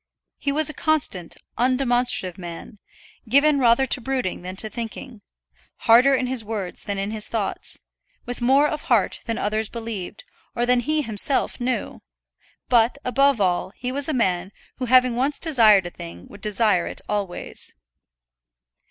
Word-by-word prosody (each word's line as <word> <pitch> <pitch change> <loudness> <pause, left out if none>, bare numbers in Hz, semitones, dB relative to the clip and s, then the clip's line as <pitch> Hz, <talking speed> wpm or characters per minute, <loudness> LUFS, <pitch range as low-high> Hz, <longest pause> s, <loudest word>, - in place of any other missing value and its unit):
He 280 - -1
was 305 +1 0
a 305 - +1
constant, 280 - -1 0.2
undemonstrative 245 -7 +2
man, 175 +3 -9 0.5
given 285 +3 +4
rather 245 +1 +4
to 255 0 +1
brooding 255 -8 -2
than 185 +1 -7
to 215 - +3
thinking; 230 +1 -7 0.6
harder 250 +4 +6
in 260 - -1
his 250 -2 -1
words 205 -4 -4
than 200 -1 -3
in 195 +2 -2
his 215 -1 -1
thoughts, 215 -4 -2 0.5
with 245 0 -6
more 270 +4 +4
of 305 0 -4
heart - - +2
than 230 -1 -3
others 215 +1 -1
believed, 225 -5 -6 0.3
or 240 - +1
than 250 0 +3
he 305 +4 0
himself 225 +5 +2
knew; 250 +1 -3 0.7
but, 240 +1 +3
above 275 0 +2
all, 185 0 0
he 250 +1 -4
was 280 +3 0
a - - +1
man 190 -6 0 0.3
who 255 - -3
having 255 0 +4
once 270 +4 0
desired 220 - +4
a 175 - -6
thing 85 - -10
would 205 - -13
desire 210 -4 +2
it - - -7
always. 200 -4 -4
235 Hz, 160 wpm, -23 LUFS, 205-260 Hz, 0.7 s, harder